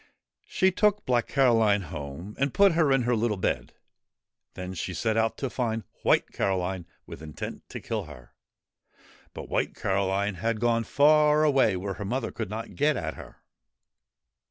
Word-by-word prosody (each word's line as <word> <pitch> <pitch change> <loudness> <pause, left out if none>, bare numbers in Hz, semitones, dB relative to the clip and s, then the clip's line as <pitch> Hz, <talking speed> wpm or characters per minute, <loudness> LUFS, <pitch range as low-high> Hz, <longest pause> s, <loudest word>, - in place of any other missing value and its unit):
She 190 0 +2
took 210 +2 +1
Black 120 -2 +1
Caroline 115 -7 +3
home 75 +5 -7
and 140 -1 0
put 200 -1 +6
her 160 -4 +2
in 135 -2 +3
her 120 0 +1
little 110 -2 0
bed. 95 - -2 0.8
Then 90 0 -6
she 90 0 -4
set 110 +6 0
out 115 0 +1
to 135 - -2
find 115 -3 -2 0.2
White - - +2
Caroline 95 -2 -2 0.2
with - - -10
intent 75 -2 -8
to - - -6
kill - - -4
her; 60 - -14 1.0
but - - -7
White - - -1
Caroline 100 +1 0
had 115 -1 0
gone 115 0 +1
far 150 +3 +4
away 135 -9 +3
where 100 +2 -4
her - - -3
mother 120 +3 -2
could 110 -4 -5
not 110 +2 -6
get 145 -1 +1
at 80 -5 -3
her. - - -13
115 Hz, 165 wpm, -27 LUFS, 95-135 Hz, 1.0 s, put